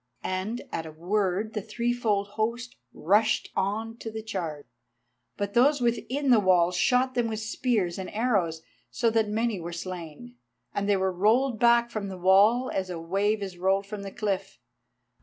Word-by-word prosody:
And 190 +6 -3
at 165 -1 -4
a - - -8
word 195 +5 -1
the 210 - -2
threefold 220 -2 -1
host 235 +3 -3 0.2
rushed 210 +7 +1
on 220 +4 -2
to 225 - -6
the 220 0 -6
charge. 170 -9 -5 0.7
But 200 0 -3
those 280 +4 +4
within 255 +3 0
the 235 - +7
walls 180 -2 +3
shot 255 +7 +2
them 240 -2 +1
with 220 -1 -3
spears 215 -5 -1
and 190 - -5
arrows, 195 -9 0 0.3
so 230 -1 +1
that 220 -1 +1
many 220 -1 0
were 170 +1 -6
slain, 165 -8 -7 0.4
and 200 0 -1
they 200 - +4
were 190 0 0
rolled 220 +6 +2
back 235 0 +4
from 210 -3 -3
the 190 -1 -6
wall 205 +8 +4
as 190 -1 -2
a 175 -2 -4
wave 200 +5 0
is 185 -3 -7
rolled 195 +2 +1
from 205 0 -7
the 200 - -6
cliff. 200 -2 -3
205 Hz, 175 wpm, -27 LUFS, 185-230 Hz, 0.7 s, the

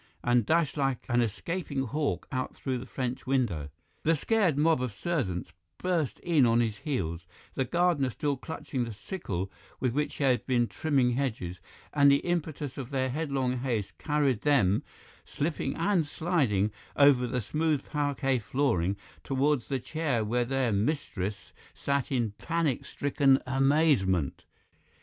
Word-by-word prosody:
and 120 -3 +3
dashed 160 -2 +2
like 135 -3 0
an 120 0 +3
escaping 135 - -2
hawk 145 +4 -2
out 130 -2 -3
through 130 -2 -2
the 125 - -8
French 130 0 -4
window. 110 - 0 0.3
The 165 +1 +3
scared 185 -2 +2
mob 155 -2 +3
of 125 -2 -1
servants 105 - -2 0.3
burst 170 -7 0
in 165 -6 +3
on 115 -1 +4
his 110 -3 0
heels, 90 - -3 0.3
the 130 - 0
gardener 170 -3 +2
still 145 +4 -1
clutching 135 -2 -4
the 115 -3 -5
sickle 100 - -4 0.3
with 125 -2 0
which 150 +2 -1
he - - -2
had 130 -3 +3
been 120 -2 +3
trimming 135 -1 +1
hedges, 110 -9 -2 0.3
and 140 -1 +6
the 140 - +6
impetus 155 -5 -2
of 130 -2 -5
their 130 -2 0
headlong 135 -4 -1
haste 120 -6 -2
carried 145 -6 +1
them, 120 -10 +3 0.4
slipping 145 -2 -2
and 170 -2 +1
sliding, 135 - +1 0.2
over 140 -4 +5
the 125 - -1
smooth 150 +5 0
parquet 145 -3 0
flooring 100 -5 0 0.3
towards 135 -1 +1
the 135 - 0
chair 135 -4 -1
where 120 +3 +1
their 130 -1 0
mistress 105 - -2 0.2
sat 140 -1 -1
in 120 -5 +1
panic 165 -6 0
stricken 140 -1 +3
amazement. 135 - +2
135 Hz, 150 wpm, -29 LUFS, 120-150 Hz, 0.4 s, and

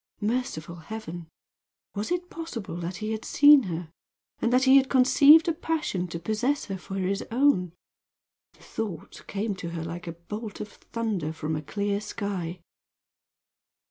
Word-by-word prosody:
Merciful 210 -8 -2
heaven! 175 -2 -7 0.7
Was 205 +1 -3
it 355 0 -2
possible 285 - -6
that 175 +1 -4
he 215 +2 -4
had 220 0 -3
seen 290 -3 +7
her, 165 -1 -5 0.5
and 235 - +1
that 255 +1 +4
he 265 +1 +7
had 270 -1 +3
conceived 285 +5 +7
a 335 - +2
passion 305 - -2
to 170 - -5
possess 220 - -1
her 195 -2 -4
for 195 - -7
his 195 +1 -1
own? 235 - +3 0.8
The - - -21
thought 205 -8 -6
came 205 +1 -2
to 170 - -5
her 165 -1 -4
like 170 +2 -6
a 170 - -4
bolt 210 +6 -7
of 210 - -5
thunder 210 -9 -3
from 160 0 -3
a 150 - -3
clear 200 +6 -2
sky. 185 -5 -4
205 Hz, 160 wpm, -27 LUFS, 175-250 Hz, 0.8 s, seen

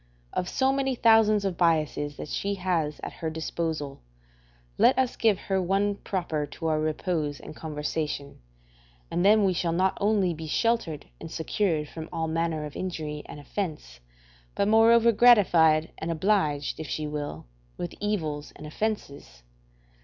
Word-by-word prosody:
Of 180 - -2
so 265 0 +2
many 270 -1 0
thousands 220 -3 +4
of 185 -4 -2
biases 155 -4 +1
that - - -6
she 200 0 -2
has 175 -5 -1
at - - -5
her 160 - -4
disposal, 160 -2 -4 0.8
let - - +5
us 260 -2 +1
give 220 -4 +3
her 190 -1 0
one 195 +3 +1
proper 170 -7 -3
to 165 +3 -5
our 155 -1 +1
repose 155 -1 -1
and 155 - -10
conversation, 150 -2 -4 0.7
and 175 - 0
then 210 +2 +6
we 190 - +2
shall 170 -1 -1
not 185 +2 +2
only 200 -4 +2
be 160 0 -7
sheltered 225 -4 0
and 165 - -8
secured 160 -1 -1
from 160 +1 -8
all 160 0 -2
manner 160 -1 -1
of 150 - -9
injury 155 -5 -4
and - - -9
offence, 150 - -5 0.6
but 200 - +1
moreover 230 +2 +6
gratified 175 -9 +5
and 160 - -4
obliged, 160 -5 0
if 160 - -5
she 155 - -2
will, 145 - -5 0.3
with 175 - -5
evils 160 -8 -2
and 150 - -10
offences. 145 - -4
165 Hz, 155 wpm, -27 LUFS, 150-200 Hz, 0.8 s, then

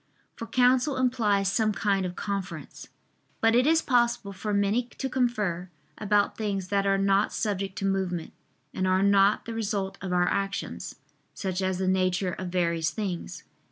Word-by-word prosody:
For 230 - -7
counsel 255 +4 +3
implies 210 -6 +2
some 215 +1 +1
kind 195 -2 0
of 180 - -7
conference. 190 -5 -5 0.5
But 225 0 +3
it 250 +3 +4
is 325 0 +4
possible 240 -5 +1
for 210 +3 -4
many 205 +4 +1
to 270 - -2
confer 210 -9 -1 0.3
about 205 -1 +2
things 195 -4 -3
that 200 -1 +1
are 195 0 +3
not 195 +1 +2
subject 195 -2 -2
to 195 - -2
movement, 190 -4 -1 0.4
and 185 - -1
are 185 +1 +3
not 200 +1 +4
the 230 - -5
result 200 -3 -2
of 190 - -4
our 180 0 +2
actions, 195 0 -3 0.4
such 190 -2 -3
as 190 -1 0
the 185 0 -1
nature 185 0 +1
of 185 - -5
various 170 -2 0
things. 190 -5 -5
200 Hz, 165 wpm, -27 LUFS, 185-220 Hz, 0.5 s, it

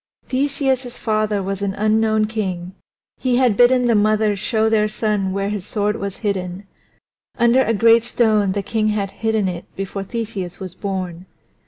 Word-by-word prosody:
Theseus's 265 -2 0
father 215 -2 0
was 195 +1 -3
an 195 -1 -2
unknown 215 +1 +2
king; 190 -5 -4 0.5
he 255 -2 +1
had 250 -5 +3
bidden 250 +2 +5
the 235 - +3
mother 215 0 +2
show 220 +2 0
their 215 -1 +3
son 210 -3 -1
where 195 +1 -1
his 205 -3 -3
sword 210 +1 -1
was 200 -3 -5
hidden. 190 -1 -2 0.7
Under 235 +2 +4
a 230 -3 +1
great 230 +2 +5
stone 215 -5 +2
the 200 0 -2
king 215 0 0
had 205 -2 -1
hidden 220 -3 0
it 175 -1 -4
before 195 +1 -4
Theseus 200 -4 -5
was 185 -2 -7
born. 185 -2 -5
215 Hz, 165 wpm, -20 LUFS, 195-225 Hz, 0.7 s, bidden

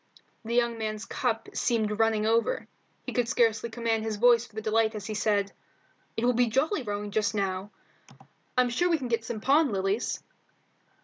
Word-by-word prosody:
The 230 +1 -3
young 235 -1 +1
man's 215 -1 -3
cup 225 -3 -2
seemed 215 -3 0
running 220 -1 +2
over. 230 - +1 0.4
He - - -5
could 245 -1 0
scarcely 230 -2 +2
command 230 -1 -1
his 220 -1 -2
voice 240 +2 +4
for 220 -2 -7
delight 220 0 +1
as 205 -2 -6
he 215 - -4
said 205 -1 +1 0.7
"It 225 - 0
will 250 - +4
be 245 +1 +3
jolly 275 - +1
rowing 205 -2 -4
just 215 0 0
now. 195 -1 -2 0.9
I'm 250 -1 +3
sure 350 +9 +1
we 335 - +3
can 260 -5 -5
get 230 -1 0
some 220 -1 -5
pond 280 +2 +4
lilies." 195 +3 -1
225 Hz, 180 wpm, -28 LUFS, 215-240 Hz, 0.9 s, voice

